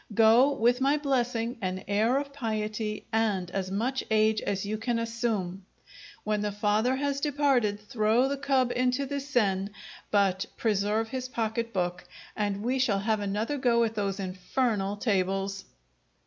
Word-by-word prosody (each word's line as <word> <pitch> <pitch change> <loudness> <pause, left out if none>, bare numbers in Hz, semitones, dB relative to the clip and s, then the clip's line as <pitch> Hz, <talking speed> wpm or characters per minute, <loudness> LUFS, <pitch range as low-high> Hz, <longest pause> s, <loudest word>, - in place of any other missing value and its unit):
Go 230 +5 +6
with 240 +3 +2
my 280 +3 +3
blessing, 245 -4 -1
an 185 0 -3
air 220 +5 +2
of 280 0 -3
piety, 215 -4 -3
and 205 -5 0
as 190 -1 -2
much 240 +7 -1
age 215 0 +3
as 195 0 -2
you 215 +1 -3
can 235 +1 -1
assume. 225 -5 -2 0.6
When 210 -1 0
the 210 0 -1
father 210 +5 +1
has 280 0 -1
departed, 275 -8 +2
throw 215 +4 +2
the 280 - -1
cub 270 -3 +1
into 250 +2 +1
the 280 +1 -3
Seine, 205 -9 0 0.4
but 195 -2 +2
preserve 215 +1 0
his 255 0 -4
pocket 230 -1 -2
book, 175 -2 -2 0.3
and 205 -1 -2
we 255 +3 0
shall 240 -6 +2
have 215 +1 +1
another 210 +8 -2
go 235 -2 +3
at 225 -1 -1
those 200 -3 -2
infernal 195 +2 -1
tables. 195 -2 -1
220 Hz, 155 wpm, -28 LUFS, 200-250 Hz, 0.6 s, Go